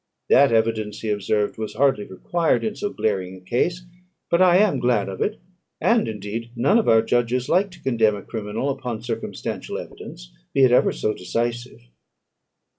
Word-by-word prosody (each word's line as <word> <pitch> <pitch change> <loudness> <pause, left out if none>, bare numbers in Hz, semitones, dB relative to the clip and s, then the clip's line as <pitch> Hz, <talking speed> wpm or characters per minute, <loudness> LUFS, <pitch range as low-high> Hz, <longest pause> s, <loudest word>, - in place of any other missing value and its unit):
"That 140 -1 +6
evidence," 110 -2 0
he 110 - -2
observed, 105 +1 -1
"was 110 -1 -5
hardly 135 -4 +2
required 165 - 0
in 220 -1 -2
so 205 - -3
glaring 95 - -2
a - - -12
case, 170 - -1 0.5
but 170 - +3
I 180 -1 +6
am 195 -9 +3
glad 120 -4 +1
of 95 -1 -6
it; 210 - -1 0.4
and, 230 -1 +2
indeed, 110 +2 -5
none 140 - +3
of 225 - +1
our 110 0 +5
judges 120 +2 0
like 190 +4 +3
to 175 -2 -16
condemn 115 -5 +2
a 100 - -8
criminal 110 +5 -3
upon 125 -5 -5
circumstantial 115 -2 -5
evidence, - - -10 0.2
be 135 - +5
it 130 - +6
ever 125 - +4
so 110 - -1
decisive." 120 +6 -3
115 Hz, 175 wpm, -23 LUFS, 105-140 Hz, 0.5 s, That